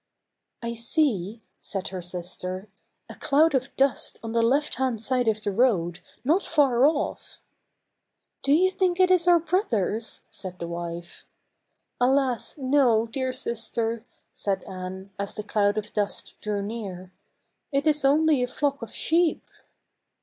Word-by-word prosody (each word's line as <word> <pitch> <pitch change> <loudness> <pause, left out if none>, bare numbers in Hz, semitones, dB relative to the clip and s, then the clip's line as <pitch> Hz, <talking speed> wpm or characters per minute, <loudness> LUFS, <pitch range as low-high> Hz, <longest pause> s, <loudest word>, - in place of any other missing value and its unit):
" - - -56
I 235 0 -2
see," 230 - 0 0.2
said 195 -1 -4
her 185 -1 -5
sister, 180 +2 -5 0.2
" - - -51
a - - -9
cloud 305 +3 +3
of 260 -1 +1
dust 275 -1 +1
on 225 - -4
the 230 0 +2
left 275 +6 +2
hand 255 -4 0
side 250 +2 0
of 215 -1 +1
the 205 - 0
road, 190 -7 +2 0.2
not 325 +9 +2
far 275 -4 +4
off." 305 -1 -2 0.6
" - - -55
Do 275 - 0
you 365 +5 +5
think 370 -1 0
it 370 0 +5
is 360 -1 +4
our 350 -1 +7
brothers?" 240 - -1
said 185 -2 -7
the 170 - -5
wife. 170 0 -6 0.4
" - - -32
Alas, 260 0 +2
no, 260 -5 +3
dear 260 +2 -2
sister," 230 -1 -2 0.3
said 195 -2 -2
Anne, 190 0 -7
as 200 0 -3
the 210 - -4
cloud 205 0 +1
of 210 0 -4
dust 205 -1 -2
drew 205 -1 -2
near; 195 -4 -6 0.3
" - - -51
it 280 +1 +1
is 300 -2 +2
only 295 0 +4
a 250 - +1
flock 280 +2 -1
of 230 - -6
sheep." 335 0 +2
235 Hz, 165 wpm, -26 LUFS, 200-280 Hz, 0.6 s, our